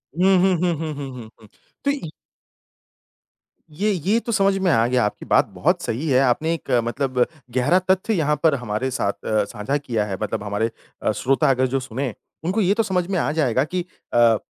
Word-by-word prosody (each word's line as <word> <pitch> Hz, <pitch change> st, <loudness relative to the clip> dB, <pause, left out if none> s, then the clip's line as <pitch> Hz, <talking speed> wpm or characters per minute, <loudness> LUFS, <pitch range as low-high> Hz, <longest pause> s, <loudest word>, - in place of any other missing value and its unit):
हुँ, 190 Hz, +2 st, +4 dB
हुँ, 190 Hz, -1 st, +4 dB
हुँ, 175 Hz, -1 st, +2 dB
हुँ, 155 Hz, -2 st, -3 dB
हुँ, 140 Hz, -1 st, -6 dB
हुँ, 110 Hz, -2 st, -9 dB
हुँ। 110 Hz, -, -16 dB, 0.4 s
तो 280 Hz, -, +3 dB
इ 275 Hz, -, -4 dB, 1.7 s
ये 210 Hz, +4 st, +1 dB
ये 195 Hz, +6 st, +1 dB
तो 235 Hz, -, -2 dB
समझ 195 Hz, -2 st, +3 dB
में 190 Hz, -3 st, +2 dB
आ 115 Hz, -3 st, +3 dB
गया 125 Hz, -2 st, +2 dB
आपकी 105 Hz, -, -4 dB
बात -, -, +4 dB
बहुत -, -, +1 dB
सही 140 Hz, +8 st, -2 dB
है 130 Hz, -1 st, +4 dB
आपने 155 Hz, +6 st, +1 dB
एक 165 Hz, -, -7 dB
अ, 120 Hz, -, +4 dB
मतलब 125 Hz, +1 st, 0 dB, 0.3 s
गहरा 145 Hz, +9 st, +3 dB
तथ्य 190 Hz, +4 st, +2 dB
यहाँ 150 Hz, -4 st, +1 dB
पर 155 Hz, -3 st, +5 dB
हमारे 125 Hz, +1 st, -2 dB
साथ 100 Hz, -4 st, -2 dB
अ, 110 Hz, -1 st, +2 dB
साझा 105 Hz, +8 st, -2 dB
किया 115 Hz, -7 st, -2 dB
है 95 Hz, -2 st, -4 dB
मतलब 105 Hz, -1 st, -2 dB
हमारे 105 Hz, +3 st, -1 dB, 0.3 s
अ, -, -, +1 dB
श्रोतागण 130 Hz, 0 st, +2 dB
जो 135 Hz, +1 st, 0 dB
सुनें, 130 Hz, -1 st, -4 dB, 0.3 s
उनको 190 Hz, +6 st, 0 dB
ये 195 Hz, +1 st, +3 dB
तो 225 Hz, +1 st, +1 dB
समझ 185 Hz, -4 st, 0 dB
में 190 Hz, -, 0 dB
आ 150 Hz, -, 0 dB
जाएगा 130 Hz, -5 st, +1 dB
कि 180 Hz, +3 st, -2 dB, 0.3 s
अ, 115 Hz, -2 st, +5 dB
140 Hz, 205 wpm, -22 LUFS, 120-180 Hz, 1.7 s, पर